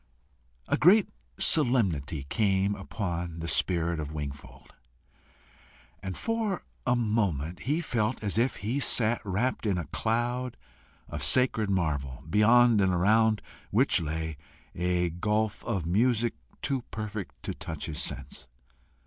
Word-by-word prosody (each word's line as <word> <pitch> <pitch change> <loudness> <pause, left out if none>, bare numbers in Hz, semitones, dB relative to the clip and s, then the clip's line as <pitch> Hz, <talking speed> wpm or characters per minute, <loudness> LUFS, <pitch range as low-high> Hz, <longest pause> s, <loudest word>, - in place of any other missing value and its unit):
A - - +2
great 195 +6 +6 0.3
solemnity 95 - +2
came 100 +1 +2
upon 90 -4 -4
the 85 0 -4
spirit 85 -1 +1
of 75 -1 -4
Wingfold, 70 -3 -8 1.3
and 95 -1 -5
for 225 -4 -1 0.2
a 125 - +4
moment 100 - 0
he 155 +4 +2
felt 120 -6 -1
as 105 +1 0
if 125 +2 +2
he 115 +7 -2
sat 120 -4 +2
wrapt 110 +4 -1
in 95 -3 +1
a 85 - -3
cloud 120 - -1 0.5
of 75 -2 -5
sacred 110 - +2
marvel, 75 -7 -1
beyond 115 +4 +5
and 95 -1 +3
around 110 +4 +3 0.3
which - - +3
lay 80 0 -3 0.4
a 90 0 0
gulf 105 +4 -1
of 100 -8 -1
music 115 +5 +2 0.3
too 135 -3 0
perfect 105 -2 -5
to - - -3
touch - - -6
his 75 - -3
sense. 65 -2 -5
100 Hz, 130 wpm, -28 LUFS, 85-120 Hz, 1.3 s, great